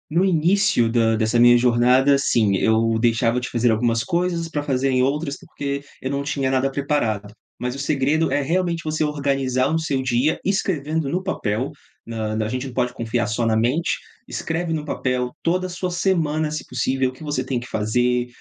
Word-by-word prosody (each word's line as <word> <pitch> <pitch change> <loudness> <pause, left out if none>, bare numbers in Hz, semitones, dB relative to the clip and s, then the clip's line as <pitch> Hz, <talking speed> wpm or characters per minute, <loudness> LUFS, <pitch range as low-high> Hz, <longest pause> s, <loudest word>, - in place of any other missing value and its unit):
No 175 +3 +3
início 180 - +3
da 115 -1 +3
dessa 110 +2 +1
minha 120 0 +7
jornada, 125 +3 +4
sim, 110 -7 +2
eu 110 +2 +2
deixava 115 +1 +2
de 125 - -4
fazer 120 0 +2
algumas 115 +1 +1
coisas 170 -2 -1
pra 150 -2 -2
fazer 135 -2 0
em 130 -1 +2
outras 140 +2 -1
porque 140 0 -5 0.2
eu 130 - -3
não 140 0 -1
tinha 140 -2 -1
nada 135 +1 +2
preparado. 125 -8 -1 0.2
Mas 125 +1 -3
o - - -7
segredo 145 +3 +1
é 145 +2 +1
realmente 170 +2 -1
você 155 0 0
organizar 135 -2 0
o 160 - +2
seu 140 -5 -1
dia 130 +4 +1
escrevendo 160 -6 -1
no 180 +7 -1
papel, 125 - -2 0.3
na 110 -2 -3
na 110 0 -1
a - - -3
gente 130 +3 -3
não 130 - -9
pode 125 -1 0
confiar 115 0 -1
só 110 +2 -1
na 110 -1 +2
mente, 125 +10 +1 0.3
escreve 165 0 -3
no 155 -2 -2
papel 125 -4 -2
toda 185 +2 0
a - - -10
sua 180 +1 -3
semana, 160 -4 0
se 155 - -4
possível, 130 +1 0
o - - -16
que 130 - -13
você 145 -4 -1
tem 130 -1 -1
que 120 +1 -5
fazer, 120 +3 0
135 Hz, 200 wpm, -22 LUFS, 120-155 Hz, 0.3 s, minha